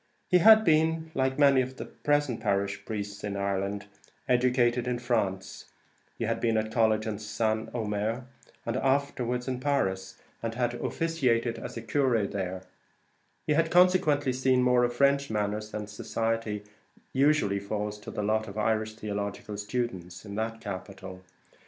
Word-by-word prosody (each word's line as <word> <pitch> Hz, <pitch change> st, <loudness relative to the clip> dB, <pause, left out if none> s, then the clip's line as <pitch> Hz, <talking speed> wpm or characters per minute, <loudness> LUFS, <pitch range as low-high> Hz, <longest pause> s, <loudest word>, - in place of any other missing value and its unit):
He 180 Hz, -, +5 dB
had 220 Hz, +3 st, +8 dB
been, 160 Hz, 0 st, +2 dB
like 130 Hz, 0 st, 0 dB
many 140 Hz, -2 st, +5 dB
of 130 Hz, +1 st, -5 dB
the -, -, -5 dB
present 145 Hz, -6 st, 0 dB
parish 100 Hz, -2 st, -1 dB
priests 100 Hz, -2 st, -5 dB
in 100 Hz, -1 st, -3 dB
Ireland, 100 Hz, +1 st, -2 dB, 0.4 s
educated 125 Hz, -1 st, +2 dB
in 125 Hz, -1 st, 0 dB
France; 100 Hz, -6 st, -2 dB, 0.5 s
he -, -, -3 dB
had -, -, -1 dB
been 115 Hz, -1 st, +1 dB
at 110 Hz, 0 st, -1 dB
college 110 Hz, -2 st, +2 dB
at 110 Hz, -1 st, -4 dB
St. 110 Hz, +1 st, -1 dB
Omer, 110 Hz, +1 st, -2 dB, 0.4 s
and 115 Hz, +1 st, -1 dB
afterwards 130 Hz, -3 st, 0 dB
at 130 Hz, -1 st, -3 dB
Paris, 95 Hz, -9 st, -1 dB, 0.2 s
and 115 Hz, 0 st, -3 dB
had 120 Hz, -1 st, 0 dB
officiated 125 Hz, -5 st, 0 dB
as -, -, -7 dB
a 115 Hz, -, -5 dB
curé 115 Hz, -4 st, +1 dB
there; 95 Hz, -1 st, -3 dB, 0.8 s
he 150 Hz, -, +2 dB
had 165 Hz, +2 st, +2 dB
consequently 165 Hz, -7 st, +4 dB
seen 130 Hz, 0 st, +2 dB
more 125 Hz, 0 st, +4 dB
of 120 Hz, -, +2 dB
French 140 Hz, +1 st, +3 dB
manners 105 Hz, 0 st, -2 dB
and 105 Hz, -1 st, -5 dB
society 110 Hz, 0 st, -2 dB
than 105 Hz, -, -25 dB, 0.4 s
usually 135 Hz, -8 st, +3 dB
falls 105 Hz, +1 st, -4 dB
to -, -, -9 dB
the 105 Hz, -, -3 dB
lot 110 Hz, +1 st, +1 dB
of 100 Hz, +1 st, -8 dB
Irish 110 Hz, 0 st, 0 dB
theological 105 Hz, -1 st, -4 dB
students 100 Hz, -4 st, -4 dB
in 100 Hz, -, -7 dB
that 110 Hz, +2 st, -3 dB
capital. 95 Hz, -1 st, -7 dB
115 Hz, 160 wpm, -28 LUFS, 105-130 Hz, 0.8 s, had